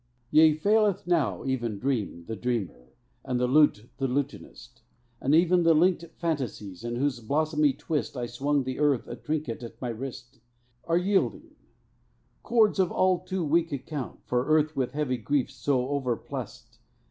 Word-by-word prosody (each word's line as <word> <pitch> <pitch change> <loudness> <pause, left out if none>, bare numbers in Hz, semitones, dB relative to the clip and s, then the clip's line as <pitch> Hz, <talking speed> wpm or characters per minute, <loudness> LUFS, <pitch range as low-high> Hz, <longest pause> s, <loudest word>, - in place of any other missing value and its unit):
Yea, 155 0 +7
faileth 205 +3 +2
now 145 - 0
even 120 -5 -1
dream 105 -8 -2
The 110 - -5
dreamer, 105 - -4 0.3
and 125 -2 -1
the 125 - +2
lute 125 -5 +3
the 135 -1 0
lutanist; 125 -3 -5 0.4
Even 170 +6 +4
the 165 -1 +5
linked 170 +1 +3
fantasies, 125 - -3
in 120 0 -3
whose 130 0 0
blossomy 150 +4 +1
twist 150 0 -3
I 120 - -2
swung 140 +4 0
the 130 +1 -4
earth 145 -5 +2
a 120 - -6
trinket 150 -5 -3
at 115 -1 -9
my 125 - -3
wrist, 125 +2 -7 0.5
Are 165 0 +2
yielding; 190 +2 0 0.9
cords 220 -4 +3
of 185 -2 +2
all 185 -1 +2
too 185 -1 -3
weak 165 +2 +2
account 140 -1 -5
For 125 0 0
earth 155 0 +2
with 130 -3 -1
heavy 140 -4 -1
griefs 135 +3 -1
so 130 -2 0
overplussed. 130 -5 -4
140 Hz, 155 wpm, -27 LUFS, 125-160 Hz, 0.9 s, Yea